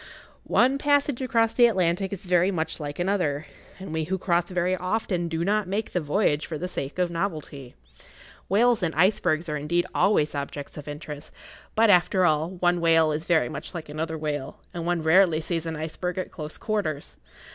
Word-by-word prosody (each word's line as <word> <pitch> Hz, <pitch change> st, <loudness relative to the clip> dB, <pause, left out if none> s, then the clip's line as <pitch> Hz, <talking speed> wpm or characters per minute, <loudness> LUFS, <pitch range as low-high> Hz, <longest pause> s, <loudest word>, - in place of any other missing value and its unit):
One 265 Hz, +3 st, +3 dB
passage 285 Hz, -2 st, +2 dB
across 230 Hz, -3 st, +2 dB
the 240 Hz, -1 st, +6 dB
Atlantic 185 Hz, -2 st, 0 dB
is 200 Hz, 0 st, -6 dB
very 180 Hz, +1 st, +3 dB
much 160 Hz, -4 st, -2 dB
like 145 Hz, -1 st, -5 dB
another, 175 Hz, -6 st, 0 dB, 0.3 s
and 190 Hz, -4 st, -8 dB
we 160 Hz, -1 st, -1 dB
who 190 Hz, +4 st, -1 dB
cross 175 Hz, -2 st, 0 dB
very 180 Hz, 0 st, 0 dB
often 185 Hz, -1 st, -1 dB
do 165 Hz, 0 st, -2 dB
not 210 Hz, 0 st, +1 dB
make 205 Hz, +4 st, -2 dB
the 180 Hz, -, 0 dB
voyage 150 Hz, -1 st, +1 dB
for 160 Hz, -, -4 dB
the 180 Hz, -, -3 dB
sake 140 Hz, -5 st, -5 dB
of 180 Hz, -1 st, +1 dB
novelty. 155 Hz, -7 st, -4 dB, 0.7 s
Whales 230 Hz, +4 st, +3 dB
and 165 Hz, -4 st, -1 dB
icebergs 170 Hz, -2 st, +2 dB
are 150 Hz, -1 st, -2 dB
indeed 170 Hz, +4 st, 0 dB
always 155 Hz, -7 st, +2 dB
objects 145 Hz, 0 st, -5 dB
of 150 Hz, -1 st, -9 dB
interest, 150 Hz, 0 st, -8 dB, 0.4 s
but, 225 Hz, -1 st, +5 dB
after 185 Hz, 0 st, +4 dB
all, 155 Hz, 0 st, +2 dB
one 175 Hz, -1 st, 0 dB
whale 165 Hz, -2 st, +4 dB
is 155 Hz, +2 st, -3 dB
very 160 Hz, -8 st, +3 dB
much 140 Hz, +8 st, -7 dB
like 160 Hz, -3 st, -6 dB
another 160 Hz, +2 st, -3 dB
whale, 145 Hz, -3 st, -4 dB, 0.2 s
and 170 Hz, -1 st, -4 dB
one 175 Hz, -2 st, 0 dB
rarely 165 Hz, 0 st, +5 dB
sees 165 Hz, 0 st, -3 dB
an 160 Hz, -, -3 dB
iceberg 165 Hz, +3 st, -4 dB
at 185 Hz, -, -3 dB
close 155 Hz, -1 st, -5 dB
quarters. 195 Hz, -10 st, -3 dB
170 Hz, 190 wpm, -25 LUFS, 155-190 Hz, 0.7 s, the